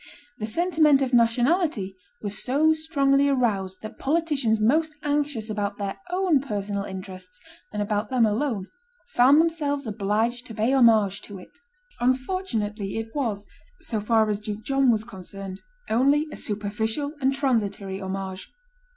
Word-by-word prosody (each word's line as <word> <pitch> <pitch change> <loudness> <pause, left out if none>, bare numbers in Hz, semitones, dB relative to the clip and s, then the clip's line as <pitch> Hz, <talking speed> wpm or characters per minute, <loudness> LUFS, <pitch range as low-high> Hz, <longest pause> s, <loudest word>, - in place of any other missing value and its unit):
The 215 - -3
sentiment 310 0 +3
of 260 -1 -3
nationality 240 - +2 0.3
was 205 -1 -3
so 300 +5 +3
strongly 280 -3 +2
aroused 200 -8 0
that 215 +2 -8
politicians 285 -7 +1
most 310 +8 +2
anxious 290 -6 -1
about 205 -2 -2
their 200 -1 -4
own 360 -5 +2
personal 205 -5 -3
interests, 185 -1 -9 0.3
and 210 -1 -1
about 210 0 -1
them 250 -3 +3
alone, 220 -2 -1 0.4
found 275 - +5
themselves 300 -4 0
obliged 220 +3 -1
to 225 - -9
pay 225 +5 +1
homage 220 -6 +4
to 205 - -9
it. 180 - -15 0.4
Unfortunately, 245 - -1
it 225 0 -5
was, 220 -8 -2 0.3
so 220 -3 -2
far 220 0 +3
as 210 -1 -1
Duke 210 0 -6
John 270 0 +2
was 220 -2 +2
concerned, 195 -2 -9 0.3
only 280 +7 +3
a - - -6
superficial 220 +7 -3
and 265 +1 +3
transitory 210 -8 -1
homage. 190 0 -5
225 Hz, 140 wpm, -25 LUFS, 205-280 Hz, 0.4 s, found